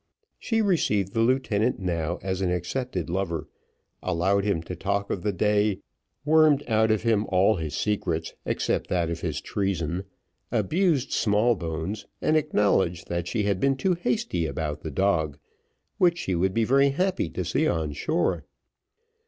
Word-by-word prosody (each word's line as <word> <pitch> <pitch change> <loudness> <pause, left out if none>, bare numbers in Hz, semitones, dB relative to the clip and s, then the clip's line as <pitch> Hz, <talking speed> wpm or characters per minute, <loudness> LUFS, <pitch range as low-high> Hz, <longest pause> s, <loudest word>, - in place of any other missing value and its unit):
She 225 -2 0
received 105 - +1
the 115 - 0
lieutenant 120 -2 +1
now 85 -2 -2
as 95 0 -2
an 95 - +1
accepted 90 +2 -2
lover, 85 -3 -2 0.5
allowed 95 +4 +1
him 95 -6 0
to 90 - -6
talk 100 +3 -2
of 95 - -2
the 105 - 0
day, 105 +1 +1 0.4
wormed 155 -2 +5
out 110 -1 +3
of 110 -1 +1
him 110 -2 +2
all 95 +2 +3
his 80 -3 -4
secrets 85 -6 -1
except - - -1
that 85 -2 0
of 85 - -4
his 80 -3 -2
treason, 95 -2 -2 0.5
abused 145 - +1
Smallbones, 100 -3 0
and 155 - +1
acknowledged 100 - +1
that 85 0 -2
she 105 +4 -1
had 100 -2 0
been 135 +3 +2
too 185 +7 +1
hasty 175 - -1
about 75 +1 -4
the 80 - -5
dog, 80 -3 0 0.6
which 175 -1 +4
she 95 - -2
would 95 +2 0
be 115 - +3
very 140 +4 +4
happy 180 - 0
to - - -4
see - - +1
on 80 -2 -1
shore. 155 - 0
100 Hz, 160 wpm, -26 LUFS, 85-120 Hz, 0.6 s, wormed